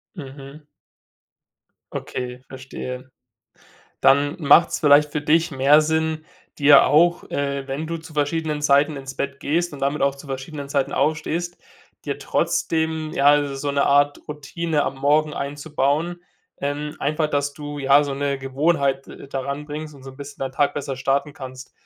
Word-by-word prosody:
Mhm. 140 -1 -10 1.3
Okay, 125 0 -5
verstehe. 130 0 -8 0.9
Dann 145 +1 +4
macht's 165 +2 +5
vielleicht 145 -1 +5
für 150 - -2
dich 160 +3 +2
mehr 140 +2 +5
Sinn, 160 0 -1 0.3
dir 145 -1 +7
auch 170 +3 +3
äh, 140 -1 -2
wenn 140 +4 -4
du 165 +1 -3
zu 160 0 -13
verschiedenen 150 0 -1
Zeiten 145 +1 +3
ins 135 -1 -8
Bett 140 0 -4
gehst 170 +3 0
und 140 - -9
damit 140 +2 0
auch 140 0 +2
zu 140 +1 -13
verschiedenen 140 +2 -6
Zeiten 140 -1 0
aufstehst, 160 +4 -1 0.5
dir - - -3
trotzdem, 160 -1 -1
ja, 145 +1 +4
so 140 +1 -3
'ne 140 0 +2
Art 145 +1 +3
Routine 150 +1 -2
am - - -3
Morgen 150 +2 +2
einzubauen. 145 +4 -2 0.4
Ähm, 145 +2 -3
einfach, 155 +2 0
dass 145 -1 -1
du, 145 -1 -7
ja, 140 +1 +5
so 140 -1 -3
'ne 140 0 -1
Gewohnheit, 135 0 0
äh, - - -11
daran 140 +2 -4
bringst 150 0 -6
und 135 - -15
so 135 - -8
'n 130 - -16
bisschen 140 0 -10
dein 135 -1 -3
Tag 145 +1 +1
besser 140 -2 -4
starten 135 +3 0
kannst. 130 -1 -10
145 Hz, 160 wpm, -22 LUFS, 140-155 Hz, 1.3 s, dir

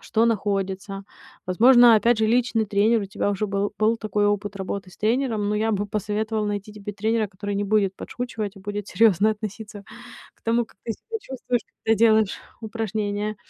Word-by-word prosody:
что 225 +1 +1
находится. 195 -2 -2 0.4
Возможно, 240 +5 +7
опять 230 +2 +3
же, 220 - +2
личный 230 -1 +2
тренер 210 +2 +2
у - - -3
тебя 195 +1 -2
уже 205 +1 -1
был, 200 +1 -1
был 220 +2 +3
такой 210 -2 0
опыт 205 0 -1
работы 190 -1 -5
с - - -17
тренером, 220 -2 0
но 210 - 0
я 220 +1 +1
бы 205 0 -1
посоветовала 215 +1 -2
найти 205 0 -4
тебе 210 -1 -7
тренера, 220 +1 0
который 205 +1 -5
не 205 - 0
будет 200 -2 +1
подшучивать, 220 -5 -5
а 195 - -12
будет 205 0 -5
серьёзно 215 -2 +4
относиться 210 -1 -7 0.5
к - - -36
тому, 230 +1 +1
как - - -25
ты 230 - -2
себя 450 - -7
чувствуешь, 255 - -3 0.2
когда 225 0 +3
делаешь 220 -2 +3 0.2
упражнения. 215 -1 -3
210 Hz, 180 wpm, -24 LUFS, 205-225 Hz, 0.5 s, Возможно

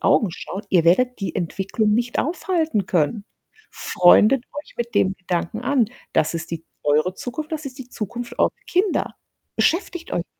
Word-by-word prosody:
Augen 215 - +3
schauen. 190 +4 -6
Ihr 175 -3 +4
werdet 245 +8 +3
die 195 - -3
Entwicklung 195 +5 -1
nicht 240 +2 0
aufhalten 320 - 0
können. 180 +5 0 0.5
Freundet 215 +8 +5 0.2
euch - - -19
mit 235 0 -3
dem 190 +1 +3
Gedanken 180 +4 -2
an. 255 -1 +2 0.3
Das 160 0 +2
ist 165 -1 -5
die 165 -1 -5 0.2
eure 150 +5 +2
Zukunft, 270 - -6
das 310 -2 -3
ist 260 0 -8
die 255 -1 -9
Zukunft 235 +2 -6
eurer - - +5 0.2
Kinder. 370 +1 0 0.4
Beschäftigt 345 0 0
euch 175 - 0
damit. - - -34
220 Hz, 165 wpm, -22 LUFS, 180-270 Hz, 0.5 s, Freundet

